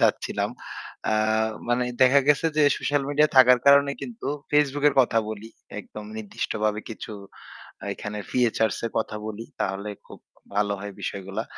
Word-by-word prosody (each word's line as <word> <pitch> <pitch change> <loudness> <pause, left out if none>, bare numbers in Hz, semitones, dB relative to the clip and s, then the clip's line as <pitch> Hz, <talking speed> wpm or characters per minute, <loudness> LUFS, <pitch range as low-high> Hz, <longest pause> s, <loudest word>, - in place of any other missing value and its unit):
চাচ্ছিলাম। - - +1 0.6
আ - - +2 0.6
মানে 120 +1 +2 0.2
দেখা 130 +2 +6
গেছে 150 +2 +4
যে, 155 - +4 0.2
সোশ্যাল 145 -1 0
মিডিয়া 150 +1 +3
থাকার 125 -1 +8
কারণে 140 0 +7
কিন্তু 235 -1 -7 0.2
Facebook 145 -1 +2
এর 140 - -2
কথা 120 -3 +2
বলি। 110 +1 -7 0.3
একদম 105 +1 -10
নির্দিষ্টভাবে 105 0 -2
কিছু 110 - -7 0.8
এখানে 105 0 -6
ফিচার 115 -3 +2 0.2
এর 115 - -3
কথা 110 -1 -2
বলি। 110 +1 -6 0.2
তাহলে 100 +2 -2 0.2
খুব - - -12 0.4
ভালো 105 0 +2
হয় 100 0 -7
বিষয়গুলা। 95 0 -4
115 Hz, 145 wpm, -25 LUFS, 105-140 Hz, 0.8 s, থাকার